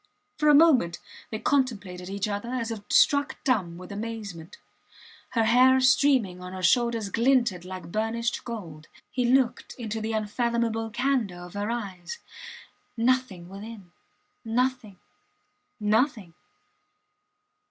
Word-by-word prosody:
For 300 -1 +4
a 295 - +7
moment 270 - +5 0.3
they 220 - -3
contemplated 205 -10 -1
each 200 +1 -2
other 205 +3 -4
as 240 -2 -2
if 220 -2 -5
struck 285 -1 +4
dumb 190 - 0
with 180 +1 -10
amazement. 205 -6 -6 0.8
Her 230 - +2
hair 255 +3 +5
streaming 250 -7 +3
on 180 0 -8
her 185 -1 -6
shoulders 230 +1 +2
glinted 235 -5 +2
like 185 -2 -8
burnished 230 +3 -1
gold. 170 -10 -8 0.2
He 250 -1 0
looked 250 -1 +1
into 225 -2 -4
the 220 +1 -2
unfathomable 225 +1 -1
candour 235 -6 -1
of 180 - -12
her 205 +1 -3
eyes. 195 -7 -5 0.8
Nothing 230 -7 0
within 200 -1 -10 0.5
nothing 235 -3 -1 0.8
nothing. 215 - +1
225 Hz, 120 wpm, -26 LUFS, 190-250 Hz, 0.8 s, a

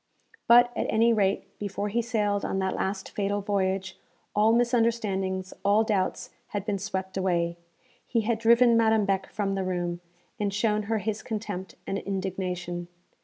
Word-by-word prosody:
_ - - -41
But, 240 +1 +6
at - - -1
any 230 +1 +4
rate, 200 -3 0
before 205 0 -3
he 235 +4 +1
sailed 210 -4 0
on - - -1
that 190 0 0
last 190 0 -3
fatal 205 0 -1
voyage, 190 -1 -1 0.4
all 210 +2 +5
misunderstandings, 225 -6 +1
all 205 +2 +4
doubts 205 -4 -1 0.2
had 205 -2 -4
been 205 -2 -1
swept 190 -1 -4
away. 170 -2 0 0.5
He 230 - +1
had 220 0 0
driven 235 +1 +5
Madame 220 -2 +4
Beck 195 -1 0
from 200 -2 -1
the 195 -1 -1
room, 175 -1 -2 0.4
and 205 -1 0
shown 210 +1 +1
her 225 - +2
his 215 0 -2
contempt 205 -4 -5
and 195 - -2
indignation. 180 -2 -3
200 Hz, 165 wpm, -27 LUFS, 190-220 Hz, 0.5 s, But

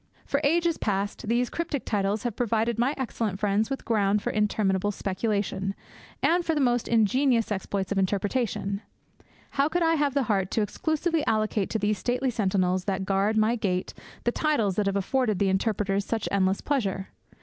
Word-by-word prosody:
For 280 - 0
ages 335 +2 +2
past 200 0 -2
these 240 +2 +1
cryptic 330 -5 -3
titles 205 0 0
have 240 -4 -2
provided 230 -1 0
my 260 +5 +2
excellent 225 -6 -2
friends 210 +1 +1
with 270 - -4
ground 205 -2 +2
for - - -1
interminable 205 -2 +1
speculation, 195 0 -2 0.5
and 345 +1 +3
for 325 -1 0
the - - +1
most 245 -3 +2
ingenious 230 +1 +2
exploits 195 -1 -2
of 200 - +1
interpretation. 200 +1 -1 0.7
How 280 +2 +2
could 350 +2 +1
I 330 0 +3
have 290 -3 +1
the 280 - +3
heart 195 -5 0
to 220 - +2
exclusively 315 - -1
allocate 215 -2 +1
to - - 0
these 210 -1 0
stately 250 +4 0
sentinels 185 -4 +1
that 190 -1 -1
guard 200 +3 +1
my 220 +2 +3
gate 185 -5 -2 0.3
the 240 - +2
titles 240 - +1
that 210 -1 +1
have 195 - 0
afforded 215 +2 +1
the 200 0 +2
interpreters 200 0 0
such 225 +1 -2
endless 190 -1 +1
pleasure? 200 -9 -1
215 Hz, 175 wpm, -26 LUFS, 195-250 Hz, 0.7 s, and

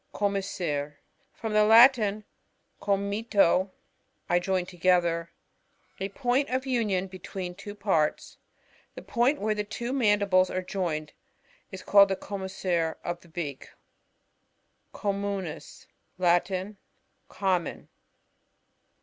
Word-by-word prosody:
Commissure. 180 -8 -2 0.2
— - - -42
From 220 -1 -3
the 215 0 +5
Latin, 220 -2 +6 0.6
com' 200 0 0
mitto, 200 -3 +2 0.6
I 175 - +3
join 185 0 -1
together. 175 -2 +1 0.7
A 195 - -3
point 250 +6 0
of 260 +1 -1
union 215 -8 0
l>etween 185 -1 -7
two 205 +2 -9
patts. 190 -7 0 0.6
The - - -9
point 255 +4 +1
where 215 +1 0
the 210 0 -2
two 235 +4 -5
mandibles 200 -7 +3
are 185 - -3
joined 165 -6 -3 0.6
is 190 -1 -8
called 200 -1 +6
the 195 - 0
commis 190 0 -7
sure 170 -3 0
of 175 0 -4
the 170 - -19
beak. 155 -5 -6 1.2
Communis. 200 -5 -4 0.2
— - - -46
Latin. 185 +3 +1 0.5
Common. 185 -3 -2
195 Hz, 115 wpm, -27 LUFS, 180-210 Hz, 1.2 s, Latin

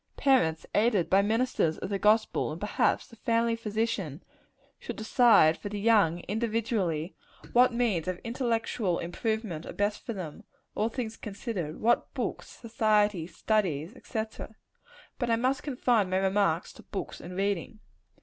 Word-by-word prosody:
Parents, 170 - +2
aided 210 -5 +2
by 195 +1 +6
ministers 220 -6 +1
of 185 - -5
the 200 -1 -1
gospel, 215 -5 +2
and 155 - -6
perhaps 210 +2 +1
the 230 - -16
family 230 +1 +1
physician, 210 -8 -2 0.6
should - - -6
decide 220 -8 +5
for 205 - -5
the 205 0 -4
young, 200 -6 +3
individually, 210 - -1 0.4
what 250 +1 +6
means 230 -9 0
of 185 -1 -2
intellectual 230 -5 -1
improvement 185 -1 -3
are - - -6
best 205 +1 -1
for 230 - -4
them, 185 +1 -7 0.3
all 215 +2 0
things 225 -2 -5
considered; 195 -6 -5
what 240 +2 +2
books, - - -3
society, 210 -6 +1
studies, 185 -5 -1
&c. 220 -3 -2 1.0
But 245 -3 -1
I 230 - +4
must 255 +3 0
confine 245 -7 +1
my 185 - +1
remarks 190 -3 +1
to - - -14
books 195 - -6
and 180 +1 -8
reading. 200 +1 -2
210 Hz, 150 wpm, -29 LUFS, 185-230 Hz, 1.0 s, by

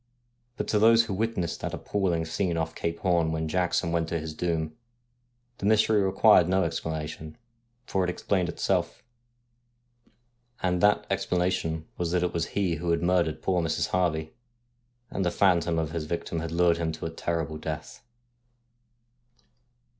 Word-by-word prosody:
But - - -3
to 105 - +2
those 115 +1 +6
who 105 - -4
witnessed 95 -5 -2
that - - -3
appalling 90 -5 -1
scene 85 +1 -1
off 80 - -2
Cape 85 0 -3
Horn 85 -3 +2
when 80 0 -2
Jackson 90 0 0
went 85 -1 0
to 85 - -1
his 80 0 -6
doom, 80 -1 -2 0.8
the 100 - -1
mystery 110 0 +4
required 95 -2 +5
no 95 0 +3
explanation, 80 -1 -4 0.5
for 95 -5 0
it 90 - 0
explained 90 0 0
itself: - - -1 1.6
and 90 -1 +1
that 105 +1 +4
explanation 90 -4 0
was 85 -1 0
that 90 -1 +2
it 90 - -1
was 85 -1 -1
he 90 -5 +1
who 85 +2 -3
had 85 0 +1
murdered 85 -3 +1
poor 90 -2 +1
Mrs. 80 -2 -1
Harvey, 80 -4 0 0.8
and 95 - -1
the 90 - +2
phantom 85 -3 +2
of 80 -1 -1
his 80 -2 -3
victim 85 0 -3
had 80 0 -4
lured 85 0 +3
him 85 -1 -1
to 80 - -6
a 80 - -3
terrible 80 -2 -3
death. 75 -1 -6
85 Hz, 160 wpm, -27 LUFS, 80-95 Hz, 1.6 s, those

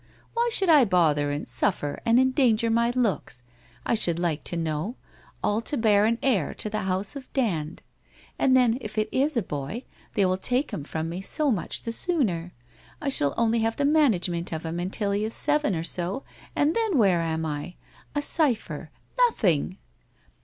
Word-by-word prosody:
Why 470 +1 +1
should 390 -4 +2
I 300 -4 +7
bother 160 -8 +2
and 145 +1 -3
suffer 145 -7 -1
and 230 +2 +5
endanger 250 -4 +3
my 235 +1 +2
looks, 210 - -1 0.4
I - - +1
should 175 -7 +3
like 170 -3 -1
to 170 - -1
know, 165 +7 -2 0.5
all 210 +2 +1
to 285 - -2
bear 210 -2 +4
an 230 +1 +1
heir 210 - +1
to 215 - -2
the 215 - -1
house 190 +6 0
of 270 -2 -9
Dand? 170 - -1 0.6
And 260 -1 +4
then, 245 -1 +3
if 215 +1 -7
it 215 0 +1
is 280 +1 +1
a 230 - +1
boy, 150 - -5 0.3
they 200 -4 +3
will 185 0 +1
take 255 +8 0
him 145 - -4
from 160 +2 -4
me 175 +3 -5
so 290 +8 -1
much 200 -7 -3
the 230 - -3
sooner. 210 - -1 0.5
I 290 - -2
shall 145 - +2
only 230 0 +2
have 225 0 0
the 285 - +1
management 195 - +2
of 160 0 -4
him 165 +1 -3
until 200 +3 -1
he 200 +1 0
is 220 +1 -2
seven 295 -8 +1
or 160 - -2
so, 180 +9 -2 0.3
and 295 +2 +2
then 445 -8 +1
where 190 -7 +4
am 160 -1 -2
I? 150 +3 -5 0.4
A 290 - 0
cypher 285 -7 0 0.2
— - - +2
nothing 185 - 0
215 Hz, 190 wpm, -26 LUFS, 170-260 Hz, 0.6 s, I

